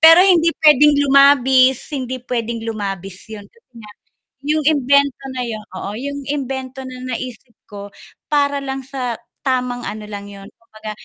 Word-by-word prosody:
Pero 330 +2 +9
hindi 340 -4 +4 0.2
pwedeng 295 0 +7
lumabis, 265 -2 +4
hindi 260 -2 -3
pwedeng 230 -2 -3
lumabis 195 -3 -5
yun 210 -2 -9
kasi 465 - -29
nga 215 -2 -12 0.5
yung 305 +2 +1
imbento 280 -2 +2 0.2
na 250 - -2
yon 220 -2 -5 0.2
oo, 200 - -5
yung 280 +4 -5
imbento 265 -2 -4
na 255 -1 -8 0.2
naisip 240 0 -7 0.2
ko 200 -1 -8 0.4
para 285 -1 +1
lang 270 -1 -5
sa 255 -2 -4 0.3
tamang 250 -2 -1
ano 210 +1 -6
lang 205 -1 -7
yun, 200 -1 -11
kumbaga 215 -1 -10
255 Hz, 150 wpm, -19 LUFS, 220-280 Hz, 0.5 s, Pero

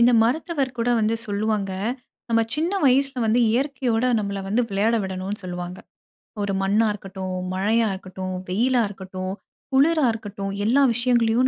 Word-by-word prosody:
இந்த 240 +1 +6
மருத்துவர் 265 +1 0
கூட 230 +1 0
வந்து 220 +1 +2
சொல்லுவாங்க, 205 -1 -1 0.6
நம்ப 230 -1 +3
சின்ன 325 +5 0
வயசுல 270 -1 +3
வந்து 225 +3 +3
இயற்கையோட 250 -2 0
நம்பள 200 -1 -3
வந்து 225 +5 +2
விளையாட 210 +4 +2
விடனும்னு 190 +2 -4
சொல்லுவாங்க. 180 0 -5 0.7
ஒரு 200 -1 -1
மண்ணா 205 +4 +3
இருக்கட்டும், 190 -2 -6 0.2
மழையா 220 +4 +2
இருக்கட்டும், 185 0 -6 0.2
வெயிலா 240 +6 +2
இருக்கட்டும், 190 -1 -6 0.4
குளிரா 300 +2 +4
இருக்கட்டும் 200 -3 -5
எல்லா 255 +6 +4
விஷயங்களையும் 240 0 +3
220 Hz, 135 wpm, -23 LUFS, 195-245 Hz, 0.7 s, இந்த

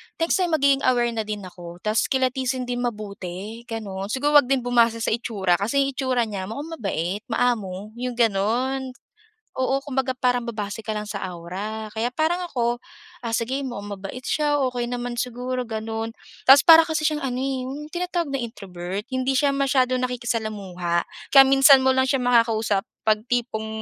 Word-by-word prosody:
next 330 +3 +1
time, 350 -3 +2
magiging 280 -2 +3
aware 240 -2 +3
na 220 -2 -3
din 210 -1 -4
ako 175 -1 -10
tapos 215 +1 +1
kilatisin 260 -1 0
din 245 0 -3
mabuti, 210 -1 -5
gano’n. 200 -4 -5
Siguro 290 +5 +4
huwag 250 - -1
din 270 -2 +1
bumase 235 -2 +2
sa - - 0
itsura 200 -6 0
kasi 275 +8 +1
'yong 275 - -1
itsura 255 -3 +1
niya 195 -4 -4
mukhang 285 +9 -6
mabait, 190 -1 -2
maamo, 215 -5 -1
'yong 250 -1 -3
gano'n. 240 +4 +1 0.7
Oo, 260 +1 +1
kumbaga 260 -2 -1
parang 245 -1 +2
babase 220 -2 -5
ka 220 - -5
lang 210 0 -3
sa 200 -2 -5
aura 190 +5 -5
kaya 230 +3 -1
parang 325 +6 0
ako, 240 -1 -1 0.4
ah, 230 - -3
sige 245 +5 -1
mukhang 205 -6 -5
mabait 195 +6 -8
siya, 295 -1 +1
okey 245 -1 -3
naman 245 0 -3
siguro 250 +1 -3
gano'n. 225 0 -4 0.3
Tapos 275 +2 +7
para 325 -1 +10
kasi 315 -1 -1
siyang 300 0 0
ano, 250 -2 -2
eh, 265 -1 -2
yung 280 +4 -6
tinatawag 345 -3 -3
na 265 - -1
introvert, 195 -3 -6
hindi 260 0 +1
siya 280 0 +2
masyadong 255 -2 +2
nakikisalamuha, 215 -8 -2 0.2
kaya 270 -1 +9
minsan 270 0 +6
mo 260 - +5
lang 260 0 +2
siya 270 - +2
makakausap 225 -5 +2 0.2
'pag 215 -1 +3
tipong 235 -3 -1
240 Hz, 175 wpm, -23 LUFS, 215-265 Hz, 0.7 s, para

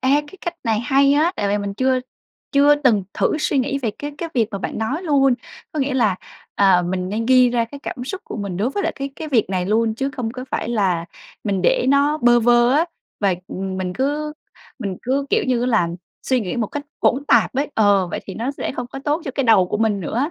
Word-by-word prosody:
Ê, 260 - 0 0.2
cái 385 - -13
cách 345 0 -4
này 220 -1 +1
hay 275 +2 +3
á. 315 +5 +3
Tại 200 -1 -1
vì 205 +1 +1
mình 200 -1 -4
chưa 260 +2 +1 0.5
chưa 285 +1 +6
từng 240 -10 +2
thử 310 - +1
suy 290 -2 0
nghĩ 275 +2 0
về 235 -5 -1
cái 290 0 -5
cái 335 - -3
việc 225 -3 +2
mà 200 - -4
bạn - - -4
nói 270 +11 -2
luôn. 275 -5 +3 0.4
Có 305 - -2
nghĩa 270 0 0
là, 215 -8 +2 0.4
à, 190 -3 +4
mình 180 +1 -2
nên 225 +3 -2
ghi 255 -1 +5
ra 235 -1 +1
cái 280 +5 -11
cảm 250 - -5
xúc 385 +7 -5
của - - -7
mình 200 -4 -4
đối 225 +7 0
với 405 - -2
lại - - 0
cái 275 0 -4
cái 315 - -6
việc 230 -8 +2
này 185 -1 -1
luôn, 220 +1 +1
chứ 270 +4 -2
không 245 -5 -4
có 255 0 -6
phải - - -2
là 190 -7 +1 0.4
mình 195 -3 -1
để 245 - +2
nó 285 +2 +3
bơ 240 -2 +5
vơ 240 +1 +4
á. 310 +4 +4 0.4
Và, 195 -3 +2
ừm, 190 0 -4
mình 185 -1 -3
cứ 295 +5 -1 0.5
mình 195 -6 -4
cứ, 275 +2 0
kiểu - - +2
như 250 -2 +1
á 245 - 0
là, 215 -9 +2 0.3
suy 260 -2 +1
nghĩ 200 +4 -3
một 225 -3 0
cách 290 - -5 0.2
hỗn 275 +3 +2
tạp - - +3
ấy 285 +3 0
ờ, 200 -4 +4
vậy - - -4
thì 190 - -7
nó 235 +4 -2
sẽ 280 - -4
không 245 - -3
có 270 - -8
tốt 305 +3 0
cho 270 - -3
cái 275 - 0
đầu 205 -6 +5
của - - -1
mình 215 -2 +1
nữa. 250 - -1
245 Hz, 255 wpm, -21 LUFS, 205-280 Hz, 0.5 s, chưa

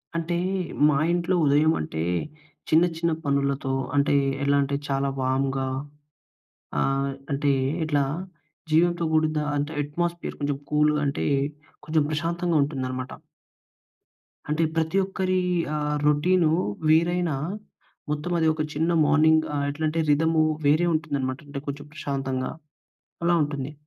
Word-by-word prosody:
అంటే, 165 +1 -1 0.5
మా 145 - +2 0.2
ఇంట్లో 175 +1 +1
ఉదయం 145 +2 +4
అంటే 80 +1 -4 0.7
చిన్న, 160 +2 +5
చిన్న 170 0 0
పనులతో 140 -1 0 0.2
అంటే 140 0 +3 0.3
ఎలా 140 0 +3
అంటే, 140 +1 -2
చాలా 135 0 0
వార్మ్‌గా 135 +1 0 1.1
ఆహ్, 135 0 +1 0.2
అంటే 140 +1 +1 0.3
ఇట్లా 145 -3 +1 0.7
జీవంతో 170 +2 +3
కూడిన 155 -1 +2
అంటే 145 +2 -2
అట్మాస్ఫియర్ 170 +4 -3
కొంచెం 145 -1 -1
కూల్‌గా 150 0 +3
అంటే 140 - -1 0.6
కొంచెం 155 +1 +2
ప్రశాంతంగా 170 +2 -1
ఉంటుందనమాట. 130 -3 -4 1.4
అంటే, 155 +2 +1
ప్రతి 160 +3 0
ఒక్కరి 185 -1 -1 0.4
ఆహ్, 150 0 -1
రొటీనూ 160 +3 +3 0.4
వేరైనా 170 0 +3 0.7
మొత్తం 150 +3 -2
అది 160 - +3
ఒక 155 - -3
చిన్న 160 +3 +1
మార్నింగ్ 155 +2 +4
ఆహ్, 140 0 0
ఎట్లాంటే 155 +2 -1
రిధము 160 +2 +3 0.2
వేరే 155 +4 +4
ఉంటుందనమాట. 140 -4 -2
అంటే, 140 -1 -5
కొంచెం 145 +1 -5
ప్రశాంతంగా 135 -3 -3 0.7
అలా 175 0 +4
ఉంటుంది. 145 -1 -5
150 Hz, 120 wpm, -25 LUFS, 140-160 Hz, 1.4 s, చిన్న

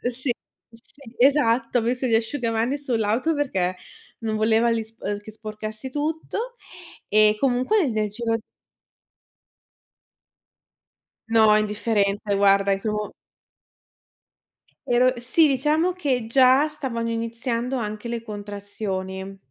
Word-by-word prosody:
Sì, 260 0 -2 0.4
sì, 245 +1 -14
esatto. 245 -3 +3
Ho - - -2
messo 250 +3 -1
gli 230 - 0
asciugamani 230 +2 0
sull'auto 245 +2 0
perché 190 -11 -1 0.4
non 220 -2 -2
voleva 220 +2 +3
li 230 -1 0
spor 225 +1 -10
ehm 205 0 -2
che 215 - -11
sporcassi 215 +2 -7
tutto. 320 - -3 0.5
E 215 0 +4
comunque 275 - +2
nel 215 -2 -1
giro 225 +2 -1 2.9
No, 220 -2 +5
indifferente 210 -1 0
guarda. 195 0 +4
In 195 - +1
quel 210 +1 -2
mo 210 0 -3 1.8
ero 250 +1 +4
sì, 255 +7 +4
diciamo 300 +6 +2
che 270 -10 -1
già 260 +4 +5
stavano 240 -6 -3
iniziando 230 +2 -2
anche 215 -1 -4
le 235 -1 -3
contrazioni. 200 -2 -5
230 Hz, 115 wpm, -24 LUFS, 215-260 Hz, 2.9 s, No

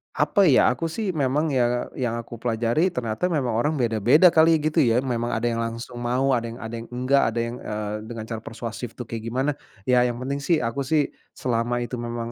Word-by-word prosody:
apa 200 - +2
ya, 135 -3 +5
aku 145 +7 -2
sih 195 +4 -2
memang 150 0 0
yang 120 -2 0
yang 120 -2 -1
aku 120 0 -7
pelajari 120 +8 +1
ternyata 125 -3 -2
memang 145 -8 0
orang 120 +8 +1
beda-beda 125 - +4
kali 165 +1 +5
ya, 155 - +1
gitu 155 +2 +1
ya, 120 -6 +4
memang 120 -2 -1
ada 115 - -3
yang 115 0 -2
langsung 115 +1 -5
mau, 125 +3 +1
ada 120 -2 +1
yang 115 - -7
ada 115 0 -6
yang 115 - -9
enggak, 130 +3 +2
ada 120 - -1
yang, 115 +1 -4
eee, 105 -1 -4
dengan 115 -2 -6
cara 110 0 -5
persuasif 115 +1 -7
tuh 125 - -5
kayak 115 -1 -6
gimana. 135 +4 +1 0.3
Ya, 125 +2 +4
yang 120 - -2
penting 140 +2 -2
sih 155 0 +1
aku 120 +4 -2
sih, 150 -2 +2 0.2
selama 120 0 -1
itu 120 0 -5
memang 120 0 -4
120 Hz, 220 wpm, -24 LUFS, 115-140 Hz, 0.3 s, ya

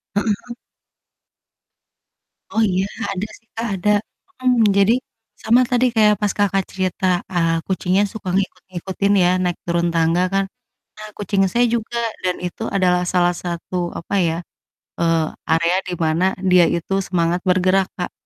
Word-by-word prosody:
Heeh 205 - +2
heeh. 225 +3 -3 2.0
Oh 225 - +3
iya, 185 +1 +1 0.3
ada 200 +2 -3
sih 225 - -33
Kak, 230 +1 -2
ada, 190 +2 -1 0.5
mhm. 245 -5 +4
Jadi, 200 +3 +5 0.5
sama 235 +3 +5
tadi 250 0 +3
kayak 210 -1 +5
pas 205 -1 +1
Kakak 195 -1 +2
cerita, 185 0 -2 0.3
eee, 165 -1 +2
kucingnya 190 +1 +1
suka 210 -4 -6
ngikut 195 0 -2
ngikutin 190 +3 -1
ya, 175 - +4
naik 175 -1 -1
turun 170 0 +1
tangga 165 +1 +2
kan. 195 0 +2 0.5
Nah, 215 0 -8
kucing 200 -1 0
saya 240 +1 +3
juga, 235 +1 -2 0.3
dan 180 -1 0
itu 180 - -7
adalah 180 -2 +2
salah 175 -1 +3
satu, 175 0 -4
apa 170 - -5
ya, 165 0 0 0.6
eee, 165 -1 +2 0.3
area 170 +2 +3
di 180 - -3
mana 160 +3 +1 0.3
dia 180 -1 +7
itu 170 +3 -3
semangat 175 -1 +1
bergerak, 185 +1 +3
Kak. 180 - -4
185 Hz, 150 wpm, -20 LUFS, 175-205 Hz, 2.0 s, dia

